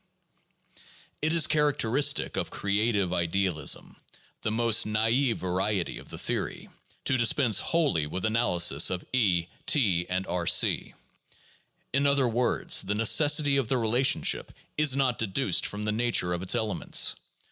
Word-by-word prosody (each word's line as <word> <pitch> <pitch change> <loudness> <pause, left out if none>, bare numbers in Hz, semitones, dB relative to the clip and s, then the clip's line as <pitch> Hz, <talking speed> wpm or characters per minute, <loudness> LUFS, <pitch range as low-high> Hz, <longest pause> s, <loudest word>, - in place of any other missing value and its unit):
It 155 - 0
is 165 -2 +3
characteristic 145 -3 +1
of - - -3
creative 100 -2 -1
idealism, 85 -3 -1 0.4
the - - -2
most 115 0 +1
naive 115 +4 +1
variety 95 +1 -2
of - - -15
the - - -8
theory, - - -5 0.4
to 130 - +1
dispense 115 -2 +2
wholly 145 - 0
with 90 +6 -5
analysis 90 - +2
of 90 -1 -5
E, 95 -9 +1 0.2
T, 95 - +2
and 95 +1 -2
B 90 -1 -3
c. - - +2 1.0
In 140 +2 +2
other 140 -2 +2
words, 120 +1 0
the 105 - -3
necessity 145 +6 +3
of 135 -4 -1
the 130 - 0
relationship 120 +3 +1 0.2
is 150 -3 +3
not 130 -3 0
deduced 100 -4 0
from 105 +1 -6
the 105 - -1
nature 110 -6 0
of 85 - -4
its 95 - 0
elements. 105 -5 +1
110 Hz, 140 wpm, -27 LUFS, 95-130 Hz, 1.0 s, is